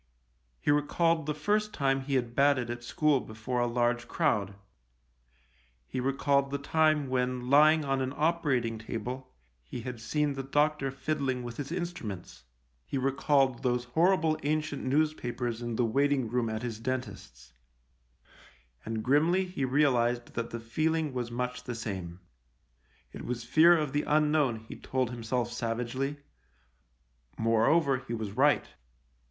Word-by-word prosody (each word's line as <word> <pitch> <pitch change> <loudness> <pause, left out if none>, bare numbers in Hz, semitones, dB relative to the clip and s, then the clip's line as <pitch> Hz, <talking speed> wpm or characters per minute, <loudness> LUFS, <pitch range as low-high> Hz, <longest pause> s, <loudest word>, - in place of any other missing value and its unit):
He - - +1
recalled 160 +2 +1
the 150 - 0
first 210 +7 0
time 135 -1 +1
he 135 +1 -2
had 120 -2 -1
batted 135 -4 +3
at 120 0 -6
school 150 +3 +2
before 110 +2 -4
a 120 - +2
large 120 0 0
crowd: 105 - 0 1.3
he 130 - -4
recalled 140 +1 +1
the 140 - -2
time 155 0 +2
when, 125 0 -1
lying 155 +1 +6
on 135 -1 0
an 130 0 -1
operating 140 -9 +1
table, 120 +3 -5 0.3
he 115 - -7
had 125 -1 -6
seen 150 +4 0
the 135 - -4
doctor 145 +1 +1
fiddling 135 -2 -2
with 120 -1 -7
his 145 +1 -5
instruments: 170 - -5 0.4
he - - -4
recalled 135 -1 +2
those 125 -1 0
horrible 165 -1 +3
ancient 150 0 -1
newspapers 125 -5 -1
in 120 -1 -3
the 120 - +2
waiting 135 +2 +1
room 120 -1 0
at 110 +1 -4
his 115 -3 -4
dentist's: 115 - -5 1.3
and 110 -1 -3
grimly 160 +8 +3
he 180 -7 -3
realised 125 -3 +1
that 115 0 -3
the 115 - -5
feeling 155 +6 -1
was 125 -2 -3
much 125 +1 -3
the 125 - -4
same. 95 -6 -5 0.9
It - - -8
was 120 -1 -4
fear 160 +8 +6
of 150 -3 -2
the 145 - +2
unknown, 150 -6 +2
he 110 - -10
told 130 -2 -2
himself 120 0 -2
savagely; 125 +5 -2 1.2
moreover, 130 +6 +3
he 115 - -2
was 110 -3 -4
right. - - +3
130 Hz, 145 wpm, -29 LUFS, 120-150 Hz, 1.3 s, lying